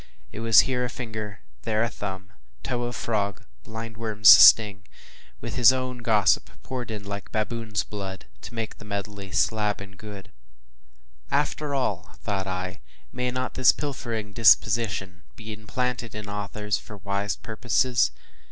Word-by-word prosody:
It - - -8
was 115 -1 +7
here 125 -2 -1
a 125 - -2
finger 110 -4 -6
and - - -37
there 110 -1 0
a - - +1
thumb, 95 -1 -7 0.3
toe 120 -2 -2
of 120 - -4
frog 100 -4 -2
and - - -26 0.2
blind 115 0 -8
worm’s 110 -2 +4
sting, 100 -3 +8 0.5
with - - -5
his 125 +1 +8
own 130 -1 -3
gossip 110 -4 +2
poured 125 -4 -5
in 105 -2 -6
like 100 0 -6
“baboon’s 110 -2 -2
blood,” 95 -2 -7 0.2
to 120 - -10
make 115 -1 -5
the - - -11
medley 100 -1 -5
“slab 105 -1 +1
and 100 0 -11
good.” 105 -3 -10 1.0
After 145 0 -1
all, 95 -9 -2
thought 95 -2 -3
I, 95 -1 -4 0.3
may 125 0 -2
not 130 +1 -3
this 130 0 +6
pilfering 115 -8 -5
disposition 110 -5 +3
be 110 -1 -8
implanted 115 +2 -4
in 105 -1 -6
authors 105 +1 -3
for 105 - -11
wise 100 +1 -2
purposes? 120 - +1
110 Hz, 155 wpm, -25 LUFS, 100-120 Hz, 1.0 s, sting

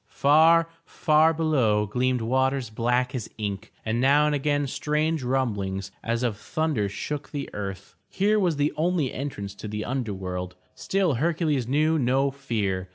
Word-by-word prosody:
Far, 160 +4 +5 0.2
far 155 -1 +3
below 135 -10 +2
gleamed 125 +3 0
waters 130 +1 0
black 125 +3 0
as 125 -5 -4
ink 100 -3 -4
and 115 +2 0
now 145 +3 +5
and 150 - +1
again 145 0 0
strange 150 +3 -1
rumblings 100 -7 -2
as 115 +1 -1
of 115 -4 -1
thunder 140 -4 -1
shook 145 +8 -5
the 140 -2 -4
earth. 95 -2 -6 0.2
Here 210 +2 +2
was 180 -5 +1
the 145 +1 0
only 160 -4 0
entrance 100 -8 -5
to 105 - -8
the 105 0 -4
under 120 -6 -2
world. 90 -1 -5 0.2
Still 190 -5 0
Hercules 150 -2 0
knew 155 +4 +2
no 135 +2 +2
fear. 105 -9 -2
130 Hz, 160 wpm, -25 LUFS, 105-150 Hz, 0.2 s, Far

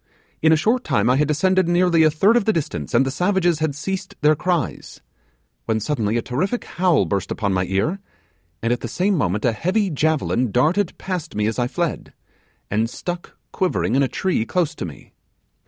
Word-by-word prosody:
In 160 - +4
a - - +6
short 225 +11 +1
time 110 +4 +2
I - - +3
had 150 +1 +2
descended 185 +4 +2
nearly 175 -1 +3
a 155 - +6
third 190 +9 +3
of 240 -4 +2
the 220 - +3
distance, 90 - -3
and 130 +3 +4
the 135 - -1
savages 175 +1 +1
had 155 -3 -1
ceased 190 +6 -4
their 155 +1 +4
cries, 175 +1 -2 0.7
when 110 -1 0
suddenly 110 -2 -1
a 115 - -1
terrific 185 - -2
howl 175 -3 +2
burst 100 -3 -2
upon 100 -3 -1
my 90 0 +1
ear, 100 - -1 0.6
and 115 +1 +2
at 120 - -2
the - - -5
same 195 +3 0
moment 105 - 0
a 120 - +4
heavy 185 - 0
javelin 145 -6 0
darted 165 - +1
past 180 -4 -5
me 105 0 0
as 110 +3 -1
I 120 - +1
fled, 170 +4 -3 0.6
and 110 +3 +1
stuck 175 +6 -6
quivering 185 -10 0
in 135 - +3
a 135 - +3
tree 185 - -1
close 155 +8 -1
to - - -5
me. - - -11
155 Hz, 200 wpm, -21 LUFS, 120-180 Hz, 0.7 s, a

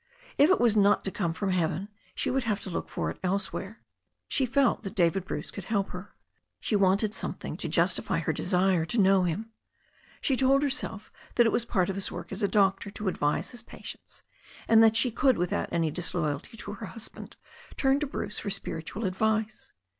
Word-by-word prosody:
If 290 - +5
It 380 - +4
was 235 -3 +4
not 205 0 +4
to 195 - -2
come 175 -5 -1
from 190 +4 -2
heaven, 180 +1 0 0.3
she - - -1
would 265 -1 0
have 210 -2 0
to 190 - -6
look - - -4
for - - -2
it - - -11
elsewhere. 195 +2 -2 0.5
She 265 - +1
felt 270 0 +2
that 195 -3 -7
David 180 +1 +2
Bruce - - -5
could 200 - -8
help 200 -2 0
her. 180 +3 -9 0.4
She 215 - -1
wanted 200 +2 +3
something - - -4
to - - -4
justify - - +2
her - - -1
desire 185 -2 +2
to 175 +9 -2
know 195 -2 +5
him. 210 +7 -3 0.7
She 270 - +1
told 270 +2 +3
herself 260 -7 -2 0.2
that 240 - +5
it 225 - +3
was 235 - 0
part 185 -6 +1
of 195 - -2
his 195 - -1
work 170 -1 -7
as 195 +3 -4
a 200 - +3
doctor 195 0 +2
to 200 0 -3
advise 150 0 -1
his 245 -1 -5
patients, 235 - -10 0.4
and 225 0 +7
that 225 0 +5
she 240 +2 +5
could 260 +3 +3
without 175 0 -1
any 165 -2 +1
dis^ 175 +3 -1
loyalty 155 - -2
to 205 -1 -6
her 210 0 -7
husband 225 +1 -9 0.4
turn 270 0 +3
to 300 - -2
Bruce 210 -5 -4
for 205 - -4
spiritual 170 +3 -4
advice. 215 +3 -1
200 Hz, 205 wpm, -28 LUFS, 185-225 Hz, 0.7 s, and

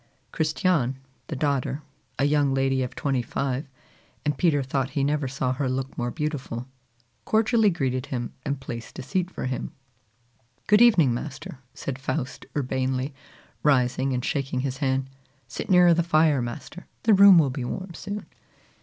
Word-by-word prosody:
Christiane, 155 -4 +1 0.3
the 155 - -4
daughter, 140 0 -1 0.3
a 140 - +2
young 145 -2 +2
lady 135 0 +1
of 125 - -4
twenty 135 -3 0
five, 135 +3 -3 0.6
and 150 0 +1
Peter 145 -2 +2
thought 135 0 -1
he 140 - +2
never 145 0 0
saw 130 -1 -1
her 135 0 -1
look 130 +1 -3
more 120 0 -2
beautiful, 135 -4 -4 0.6
cordially 220 0 +3
greeted 135 -6 -1
him, 120 -2 -4
and 140 -1 -2
placed 115 -3 -7
a - - -5
seat 180 +7 -1
for - - -5
him. 130 0 -3 0.9
"Good 210 +1 +5
evening, 175 - +6
master!" 140 +1 -6 0.2
said 135 -1 -5
Faust 130 -1 -4
urbanely, 130 0 -1 0.5
rising 130 -1 +2
and 125 -1 -1
shaking 135 -3 -1
his 135 -1 -3
hand. 135 -1 0 0.4
"Sit - - -6
nearer 180 -2 +7
the 170 - +2
fire, 155 -4 +3
master; 135 +8 -7 0.2
the 225 - +5
room 200 -2 +9
will 145 -5 +4
be 130 -1 -4
warm 185 +8 -5
soon." 200 +5 -6
135 Hz, 160 wpm, -25 LUFS, 130-155 Hz, 0.9 s, room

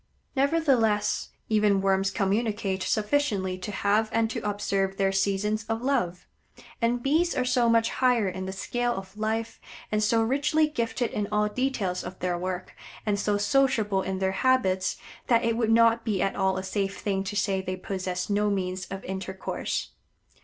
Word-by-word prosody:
Nevertheless 265 -7 +2 0.2
even 210 -2 +3
Worms 195 0 +2
communicate 200 -1 -1
sufficiently 210 -5 0
to 195 +3 -5
have 210 +2 +1
and 225 0 +1
to - - -2
observe 195 -2 -1
their 195 -1 +2
seasons 200 +2 0
of 225 +1 -2
love; 180 -10 0 0.6
and 240 +1 +1
Bees 325 +5 +2
are 255 - +1
so 250 -2 +3
much 230 0 +3
higher 245 -5 +2
in 185 0 -4
the - - -3
scale 240 +5 -1
of 190 0 -8
life, 220 +1 -2 0.3
and 210 0 +1
so 225 +2 +3
richly 285 +6 +2
gifted 235 -4 -2
in 205 -1 -2
all 210 0 +2
details 210 -6 -1
of 180 +1 -7
their 180 -1 -1
work, 185 +1 -4 0.3
and 205 -2 +1
so 205 0 +1
sociable 210 -2 +2
in 190 0 -3
their 190 0 0
habits, 190 -8 +2 0.3
that 235 -1 +4
it 230 -1 +1
would 230 -1 0
not 230 0 +4
be 210 -4 -1
at 195 - 0
all 190 -1 +1
a 190 - -3
safe 195 0 -2
thing 195 -2 -1
to 205 +2 -5
say 195 -1 +1
they 185 0 -3
possess 185 -1 -3
no 210 0 +1
means 185 -2 -2
of 195 0 -7
intercourse. 190 0 -4
210 Hz, 175 wpm, -27 LUFS, 190-230 Hz, 0.6 s, that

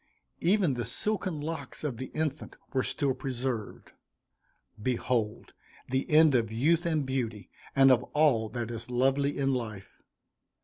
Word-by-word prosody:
Even 180 -4 +3
the 120 -1 -2
silken 185 - -1
locks 160 +1 -5
of 140 -6 -2
the 130 - -5
infant 155 -1 -4 0.2
were 130 - +2
still 135 +1 0
preserved. 125 -4 -4 0.9
Behold 115 -2 -1 0.4
the 130 +1 -1
end 155 -1 +6
of 115 -3 +1
youth 160 +9 +2
and 155 -4 0
beauty, 115 -7 -3 0.2
and 135 -1 +7
of 125 -1 +5
all 135 -8 +2
that 120 -1 -4
is 115 +1 -7
lovely 135 +3 +1
in 135 -1 +1
life! 110 -6 -6
130 Hz, 140 wpm, -29 LUFS, 120-150 Hz, 0.9 s, and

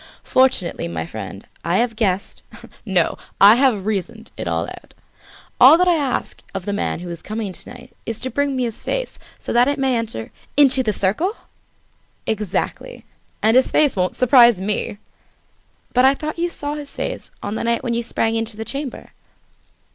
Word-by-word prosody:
Fortunately, 255 - +2
my 80 -1 -4
friend, 100 0 -8 0.2
I 170 +3 +1
have 235 -1 0
guessed, 195 -4 -1 0.5
no, 185 -4 +1 0.2
I 200 +2 +9
have 240 -6 +2
reasoned 220 +2 -3
it - - -5
all 85 0 -1
out. - - -12 0.6
All 275 +6 +9
that 360 +1 +3
I 355 - +5
ask 280 -5 -2
of 190 -2 -4
the 205 - -2
man 200 - -2
who 180 - -7
is 170 - -6
coming 215 -3 -4
to - - -7
night 245 - -13
is 225 -1 -3
to 260 - -4
bring 285 -1 0
me 255 - 0
his 230 -3 -3
face, - - -3 0.2
so - - -5
that 240 +2 +5
it 285 +1 0
may 265 -2 +1
enter 225 - -4
" - - -32
"Into 270 -2 +6
the 225 -4 0
circle?" 215 - 0 0.9
"Exactly! 220 - -3 0.4
And 220 +2 +4
his 255 - +5
face 300 -3 +3
won't 185 -1 0
surprise 240 -4 +6
me!" 205 +1 -2 1.0
"But 250 - +4
I 265 +1 +5
thought 310 +3 -5
you 345 +1 0
saw 290 -3 -4
his 295 -1 -6
face - - -4
on 205 - -3
the 220 - -3
night 235 0 0
when 240 - -1
you 235 - 0
sprang 225 -1 0
into 225 -1 -2
the 220 - -5
chamber?" 275 0 -6
230 Hz, 190 wpm, -20 LUFS, 200-265 Hz, 1.0 s, I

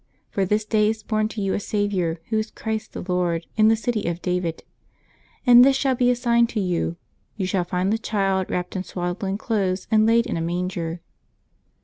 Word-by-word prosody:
For 195 - 0
this 210 +3 0
day 215 -1 +2
is 220 -1 -3
born 215 0 0
to 220 -1 -6
you 195 - 0
a - - 0
Saviour, 195 -6 -1
Who 220 - +2
is 215 0 -3
Christ 220 -1 -4
the - - -5
Lord, 175 -2 0
in 215 0 +5
the 225 - +5
city 225 -2 -2
of 170 0 -2
David. 180 -2 -2 0.8
And 245 -1 +9
this 270 +1 +5
shall 270 0 +1
be 245 0 +2
a 250 - +3
sign 235 -1 +3
to 230 - -3
you: 175 -3 -1 0.4
you 195 - -1
shall 185 -1 0
find 180 +3 0
the 225 - 0
Child 195 -4 0
wrapped 180 +2 -3
in 185 - -2
swaddling 190 +2 -3
clothes, 195 -5 -1
and 215 0 +4
laid 230 +1 +4
in - - -2
a - - -2
manger." 175 0 -3
200 Hz, 210 wpm, -23 LUFS, 180-220 Hz, 0.8 s, And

